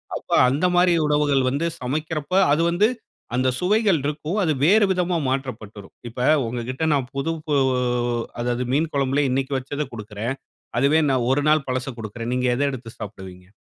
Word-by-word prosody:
அப்ப -, -, -8 dB, 0.2 s
அந்தமாரி 175 Hz, +4 st, +3 dB
உணவுகள் 145 Hz, -2 st, +2 dB
வந்து 145 Hz, +5 st, -1 dB
சமைக்கிறப்ப, 155 Hz, +4 st, -3 dB, 0.2 s
அது 150 Hz, +3 st, +3 dB
வந்து 190 Hz, +6 st, +3 dB, 0.5 s
அந்த 130 Hz, +1 st, +1 dB
சுவைகள் 200 Hz, -2 st, +2 dB
இருக்கும். 150 Hz, +6 st, -3 dB
அது 155 Hz, -3 st, +2 dB
வேற 210 Hz, +5 st, +5 dB
விதமா 180 Hz, -1 st, 0 dB
மாற்றப்பட்டுருக்கும். 110 Hz, -7 st, -5 dB
இப்ப 125 Hz, +4 st, 0 dB, 0.2 s
உங்கக்கிட்ட 125 Hz, +5 st, -4 dB
நான் 135 Hz, -3 st, -1 dB
புது 140 Hz, +4 st, -1 dB, 1.1 s
அதாவது 120 Hz, +1 st, -1 dB
மீன் 160 Hz, +3 st, +1 dB
குழம்புலே 140 Hz, +1 st, +1 dB
இன்னக்கி 135 Hz, +2 st, -1 dB
வச்சத 145 Hz, +3 st, -4 dB
கொடுக்கிறேன். 110 Hz, +3 st, -5 dB, 0.4 s
அதுவே 145 Hz, +4 st, +4 dB
நான் 130 Hz, -3 st, +1 dB
1 145 Hz, +2 st, +2 dB
நாள் 155 Hz, -2 st, +3 dB
பழச 130 Hz, +1 st, -2 dB
கொடுக்கிறேன். 115 Hz, +2 st, -5 dB
நீங்க 125 Hz, 0 st, 0 dB
எத 140 Hz, -, -2 dB
எடுத்து 120 Hz, -3 st, -7 dB
சாப்பிடுவீங்க. 95 Hz, -3 st, -9 dB
135 Hz, 150 wpm, -22 LUFS, 125-155 Hz, 1.1 s, வேற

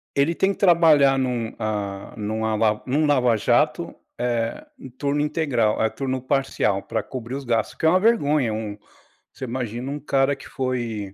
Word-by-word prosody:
Ele 140 Hz, +4 st, +2 dB
tem 190 Hz, +3 st, +1 dB
que -, -, -15 dB
trabalhar 160 Hz, -7 st, +5 dB
num 125 Hz, -3 st, -2 dB
ah, 105 Hz, -3 st, -4 dB
num 110 Hz, +1 st, -2 dB
a 110 Hz, 0 st, 0 dB
la 105 Hz, 0 st, +1 dB
num 145 Hz, +4 st, +1 dB
lava 125 Hz, -5 st, +3 dB
jato, 155 Hz, -, +1 dB, 0.2 s
eh, 120 Hz, -, -2 dB
em 130 Hz, -, -10 dB
turno 140 Hz, +3 st, -2 dB
integral 140 Hz, -8 st, +1 dB
turno 130 Hz, -1 st, -3 dB
parcial, 130 Hz, -7 st, 0 dB
para -, -, -3 dB
cobrir 125 Hz, -1 st, -6 dB
os 140 Hz, -, -5 dB
gastos, 115 Hz, -2 st, 0 dB
o -, -, -32 dB
que -, -, -2 dB
é -, -, +7 dB
uma 185 Hz, +3 st, +4 dB
vergonha, 150 Hz, -, +2 dB
um 105 Hz, -1 st, -5 dB, 0.6 s
você -, -, -10 dB
imagina 125 Hz, +1 st, -4 dB
um 145 Hz, -, -4 dB
cara 135 Hz, -1 st, +1 dB
que 135 Hz, -, -13 dB
foi, 120 Hz, -6 st, -3 dB
130 Hz, 185 wpm, -23 LUFS, 115-145 Hz, 0.6 s, é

